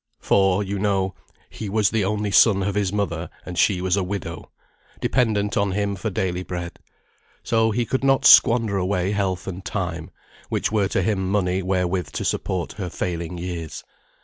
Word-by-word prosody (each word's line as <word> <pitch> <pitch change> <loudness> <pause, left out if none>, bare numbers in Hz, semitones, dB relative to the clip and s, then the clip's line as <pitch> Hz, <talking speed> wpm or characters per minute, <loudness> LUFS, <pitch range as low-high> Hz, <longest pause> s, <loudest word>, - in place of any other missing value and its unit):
For, 95 0 +2
you 100 0 -3
know, 95 -2 0 0.4
"he 105 - -6
was 105 -2 +2
the 110 -2 +1
only 105 +1 -1
son 100 +1 +5
of 100 +1 -1
his 100 -2 0
mother, 90 -5 -2 0.2
and 90 - -6
she 90 0 +2
was 95 0 +1
a 100 - +1
widow;" 90 -3 -5 0.5
dependent 105 -5 +1
on 100 -1 +1
him 100 0 -1
for 110 +4 -3
daily 90 -2 -2
bread. 85 -2 -6 0.6
So 115 -1 +2
he 120 +2 0
could 130 +3 -2
not 135 -1 +3
squander 115 -5 +6
away 95 0 0
health 95 -3 -1
and 95 0 -6
time, 90 -3 -4 0.4
which - - -1
were 105 -3 +2
to 95 - 0
him 95 -2 0
money 95 -2 +1
wherewith 90 -4 -1
to - - -3
support 90 -2 -2
her 95 -3 -5
failing 85 0 -4
years. 85 -3 -5
95 Hz, 175 wpm, -23 LUFS, 90-105 Hz, 0.6 s, squander